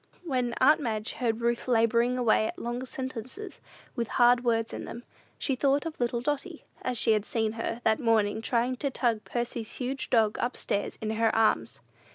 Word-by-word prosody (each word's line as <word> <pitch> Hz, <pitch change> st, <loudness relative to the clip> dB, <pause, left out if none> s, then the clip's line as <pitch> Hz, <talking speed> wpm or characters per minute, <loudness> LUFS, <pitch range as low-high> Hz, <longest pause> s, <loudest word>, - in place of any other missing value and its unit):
When 255 Hz, -7 st, -1 dB
aunt 300 Hz, +4 st, +5 dB
Madge 220 Hz, -3 st, -2 dB
heard 235 Hz, -2 st, -1 dB
Ruth 235 Hz, +1 st, 0 dB
laboring 235 Hz, +1 st, +3 dB
away 220 Hz, -3 st, +3 dB
at -, -, -6 dB
long 240 Hz, +2 st, -4 dB
sentences, 260 Hz, -, -6 dB, 0.3 s
with 235 Hz, -3 st, -1 dB
hard 245 Hz, 0 st, +5 dB
words 230 Hz, -2 st, +1 dB
in -, -, -5 dB
them, 235 Hz, -, -8 dB, 0.3 s
she 270 Hz, -, 0 dB
thought 280 Hz, +3 st, +2 dB
of 325 Hz, -1 st, -5 dB
little 240 Hz, -1 st, 0 dB
Dotty, 295 Hz, +5 st, -3 dB, 0.2 s
as 255 Hz, -1 st, -2 dB
she 225 Hz, -, +3 dB
had 215 Hz, -2 st, +2 dB
seen 220 Hz, 0 st, -1 dB
her, 230 Hz, +1 st, -4 dB
that 220 Hz, -1 st, +3 dB
morning, 220 Hz, -3 st, +2 dB
trying 245 Hz, +2 st, 0 dB
to 280 Hz, -, -1 dB
tug 235 Hz, -4 st, 0 dB
Percy's 235 Hz, -2 st, -3 dB
huge 260 Hz, +1 st, -3 dB
dog 220 Hz, -3 st, +3 dB
up 245 Hz, -, -1 dB
stairs 205 Hz, -, -2 dB
in 215 Hz, -, -1 dB
her 225 Hz, 0 st, +2 dB
arms. 225 Hz, -1 st, +1 dB
240 Hz, 190 wpm, -28 LUFS, 225-255 Hz, 0.3 s, aunt